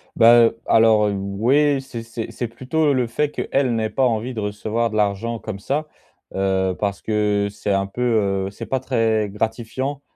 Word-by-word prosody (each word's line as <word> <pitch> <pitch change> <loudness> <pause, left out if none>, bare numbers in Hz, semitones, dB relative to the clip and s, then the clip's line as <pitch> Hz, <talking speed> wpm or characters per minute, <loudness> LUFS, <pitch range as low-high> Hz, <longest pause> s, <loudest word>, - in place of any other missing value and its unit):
Bah, 120 0 +7
heu, 115 0 -1
alors, 110 -2 +5
heu, 100 - -1
oui. 125 +9 +1
C'est 120 -4 -7
c'est 115 -1 -6
c'est 120 - -4
plutôt, 130 +7 -2
heu, 140 - +4
le 125 -2 +1
fait 145 +5 -1
qu'elle 130 -5 0
n'ait 110 -1 -1
pas 130 - +1
envie 120 +2 -1
de 110 - -5
recevoir 110 +3 -2
de 110 - -6
l'argent 105 +3 0
comme 100 -3 -6
ça, 145 +8 -2 0.5
heu, 95 -1 0
parce 100 -1 -2
que 105 -1 0
c'est 105 0 -3
un 95 0 +1
peu, 120 +5 -7 0.5
heu - - -7
c'est - - -8
pas 130 - -1
très 115 -5 0
gratifiant. 115 +6 -3
115 Hz, 195 wpm, -21 LUFS, 105-125 Hz, 0.5 s, Bah